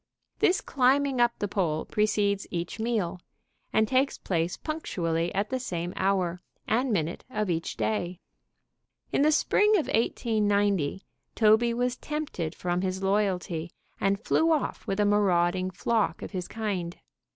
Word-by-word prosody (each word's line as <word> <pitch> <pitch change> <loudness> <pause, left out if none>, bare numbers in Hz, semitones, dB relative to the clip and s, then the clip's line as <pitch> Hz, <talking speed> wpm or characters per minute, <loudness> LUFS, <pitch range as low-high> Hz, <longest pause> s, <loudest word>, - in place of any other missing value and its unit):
This 385 -4 +3
climbing 270 0 +2
up 240 0 +3
the 205 - -2
pole 170 -6 -1
precedes 205 -1 +1
each 170 +4 -4
meal, 215 -6 -1 0.5
and 220 0 +3
takes 265 +3 +1
place 170 -1 -1
punctually 170 - -2
at 200 +4 -1
the 260 - 0
same 175 -7 -4
hour 185 -2 0 0.3
and 245 +3 +1
minute 170 -4 -1
of 215 -6 -1
each 165 0 -3
day. 180 -4 -1 0.9
In - - +2
the 305 +2 +5
spring 415 +7 +3
of 320 - 0
1890 205 - +1 0.3
Toby 220 +2 +4
was 245 +1 0
tempted 285 - -4
from 175 0 -1
his 190 0 -2
loyalty, 185 -4 0 0.3
and 195 0 +1
flew 320 +8 +2
off 310 -3 -1
with 195 +1 -1
a 205 - +4
marauding 185 -3 +2
flock 220 +3 0
of - - -6
his 185 -3 -4
kind. 195 -6 -3
205 Hz, 145 wpm, -27 LUFS, 180-235 Hz, 0.9 s, the